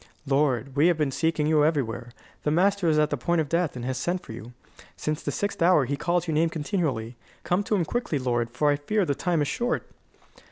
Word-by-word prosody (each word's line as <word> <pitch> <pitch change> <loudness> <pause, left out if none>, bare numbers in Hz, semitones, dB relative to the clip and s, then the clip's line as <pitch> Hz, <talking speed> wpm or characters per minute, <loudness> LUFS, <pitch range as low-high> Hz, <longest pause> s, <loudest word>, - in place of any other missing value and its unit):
"Lord, 135 -2 +1
we 145 +4 +4
have 175 -2 +3
been 150 -3 0
seeking 160 +1 0
you 155 -1 +3
everywhere. 135 -7 0 0.3
The - - 0
master 190 +3 +2
is 155 - +3
at 150 0 +2
the 145 - 0
point 170 +7 0
of 155 - 0
death, 165 -1 0
and 125 -1 -5
has 130 0 -2
sent 180 +6 -2
for - - -10
you. 115 +1 -10 0.4
Since 155 0 -2
the - - -3
sixth 205 -3 -3
hour 170 -5 +5
he 140 +3 -1
calls 175 +4 0
your 160 - -1
name 160 +2 +2
continually. 145 - -2 0.3
Come 180 +3 +1
to 210 - +1
him 180 -4 +1
quickly, 240 -6 -2
lord, 120 -3 -1
for 145 +5 +1
I 145 - +1
fear 195 +8 0
the 145 - 0
time 170 +1 0
is - - -2
short." 240 - -1
150 Hz, 235 wpm, -26 LUFS, 135-175 Hz, 0.4 s, hour